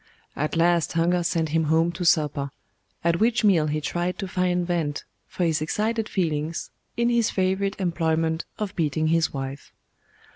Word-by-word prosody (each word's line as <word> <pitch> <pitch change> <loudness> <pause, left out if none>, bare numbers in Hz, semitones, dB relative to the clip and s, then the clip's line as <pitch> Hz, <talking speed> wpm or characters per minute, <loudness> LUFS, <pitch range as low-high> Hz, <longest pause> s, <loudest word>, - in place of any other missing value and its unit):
At 150 +3 -2
last 170 -1 +2
hunger 175 +2 +2
sent 165 -1 0
him 160 +1 +1
home 160 +2 +3
to 175 +1 -5
supper; 150 -4 +2 0.5
at 170 0 +2
which 230 +1 +2
meal 175 -7 +4
he 150 +1 -1
tried 175 +4 -2
to 195 - -4
find 180 -1 0
vent 165 -5 -1 0.2
for 180 - -3
his 160 -2 +1
excited 215 +7 -1
feelings 160 -3 -2 0.3
in 235 0 +2
his 235 -2 +2
favourite 190 +1 0
employment 165 -2 0
of 210 -2 -4
beating 155 -1 0
his 165 0 +2
wife. 135 0 -6
170 Hz, 160 wpm, -25 LUFS, 155-185 Hz, 0.5 s, meal